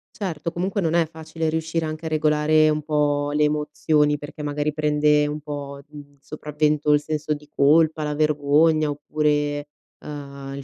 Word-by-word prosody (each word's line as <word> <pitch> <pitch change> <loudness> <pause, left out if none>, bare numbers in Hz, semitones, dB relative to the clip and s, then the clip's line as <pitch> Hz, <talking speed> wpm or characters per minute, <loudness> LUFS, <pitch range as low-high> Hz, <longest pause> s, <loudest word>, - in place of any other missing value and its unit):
Certo, 175 - -4
comunque 185 +4 -2
non 165 -2 0
è 170 -1 +3
facile 160 0 -5
riuscire 160 +1 -1
anche 155 +1 -6
a - - -2
regolare 155 0 +3
un 155 0 0
po' 145 -1 0
le 150 0 +2
emozioni, 150 0 +1
perché 145 +1 -9
magari 150 0 -2
prende 150 -1 +2
un 150 +1 -4
po', 140 -1 -6
mhmm, 145 -1 -13
sopravvento 150 +1 -1
il 145 - +3
senso 155 0 -2
di 150 0 -9
colpa, 155 +2 +3
la 150 0 -2
vergogna, 150 +1 +3
oppure, 145 0 -1 0.3
uhm, 140 -2 -8
il 140 - -7
150 Hz, 165 wpm, -23 LUFS, 145-155 Hz, 0.3 s, è